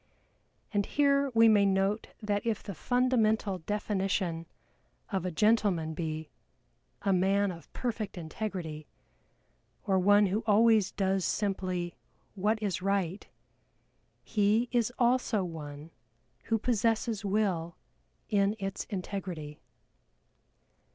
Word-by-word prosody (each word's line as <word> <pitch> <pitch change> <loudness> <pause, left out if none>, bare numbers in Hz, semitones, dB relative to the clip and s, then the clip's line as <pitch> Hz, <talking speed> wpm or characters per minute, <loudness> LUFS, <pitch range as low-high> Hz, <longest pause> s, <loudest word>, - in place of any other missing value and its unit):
And 205 -1 +1
here 280 -1 +2
we 225 0 +7
may 210 -2 +5
note 195 +2 +1 0.2
that 205 -1 0
if 225 -3 -1
the 200 - -6
fundamental 220 -2 +1
definition 190 -3 -2 0.6
of 190 -2 -1
a - - -2
gentleman 190 -4 +2
be 155 -1 -4 0.7
"a 195 - +2
man 195 +2 +2
of 170 -2 -12
perfect 225 -6 -4
integrity," 165 -3 -5 1.0
or 190 -2 +2
one 205 +2 +5
who 200 +3 0
always 215 -2 +4
does 195 -1 0
simply 185 -4 -1 0.4
what 210 +3 +1
is 190 -3 -1
right, 195 -1 -1 1.0
he 215 +2 +2
is 240 -1 +1
also 240 -4 +2
one 155 -2 -7 0.5
who 225 - +1
possesses 225 -1 0
Will 190 -5 0 0.5
in 200 0 +2
its 195 -2 -4
integrity. 180 -6 -5
200 Hz, 110 wpm, -30 LUFS, 180-220 Hz, 1.0 s, we